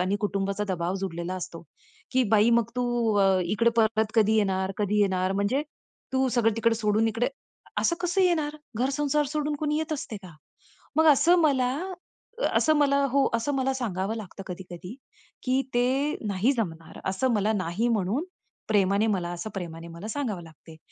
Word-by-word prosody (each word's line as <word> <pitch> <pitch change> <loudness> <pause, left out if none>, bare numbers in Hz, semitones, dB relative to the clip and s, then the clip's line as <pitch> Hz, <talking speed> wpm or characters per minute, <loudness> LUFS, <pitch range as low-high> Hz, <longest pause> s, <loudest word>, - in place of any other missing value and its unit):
आणि 190 +3 +1
कुटुंबाचा 200 0 -1
दबाव 175 +2 -2
जुडलेला 180 -1 -3
असतो. 170 -2 -7 0.5
की 260 0 +4
बाई 215 +2 +5
मग 230 0 -2
तू 250 - +1 0.3
अ, 195 -1 +5 0.2
इकडे 215 +6 +2
परत 220 -1 +2
कधी 220 -1 +4
येणार? 190 -2 +1
कधी 210 0 +1
येणार? 190 -1 +1
म्हणजे 200 +9 +1 0.5
तू 265 0 +2
सगळं 225 -2 +3
तिकडे 230 0 +2
सोडून 215 0 +2
इकडे, 230 +3 0 0.5
असं 340 - +2
कसं 355 +2 +1
येणार? 310 -4 +1 0.2
घर 255 +4 +1
संसार 295 0 +1
सोडून 300 +1 -2
कोणी 300 0 0
येत 315 0 -2
असते 230 -6 -6
का? 170 -4 -12 0.6
मग 320 0 +5
असं 340 +6 +4
मला, 260 -5 +3 0.7
अ, - - -1
असं 310 0 +3
मला 280 -1 +3
हो 275 -1 +3
असं 250 +5 0
मला 265 0 +1
सांगावं 215 -3 -2
लागतं 200 -2 -8
कधी-कधी. 180 +4 -8 0.5
की 260 +1 +1
ते 265 +5 +2
नाही 205 +6 +2
जमणार 165 -9 -4
असं 245 +6 0
मला 210 +1 +2
नाही 190 +5 -1
म्हणून, 225 - 0 0.4
प्रेमाने 200 0 +3
मला 180 -4 0
असं, 175 +5 -5
प्रेमाने 170 -3 -6
मला 170 +6 -8
सांगावं 220 -8 -3
लागते. 160 0 -14
220 Hz, 170 wpm, -26 LUFS, 190-265 Hz, 0.7 s, बाई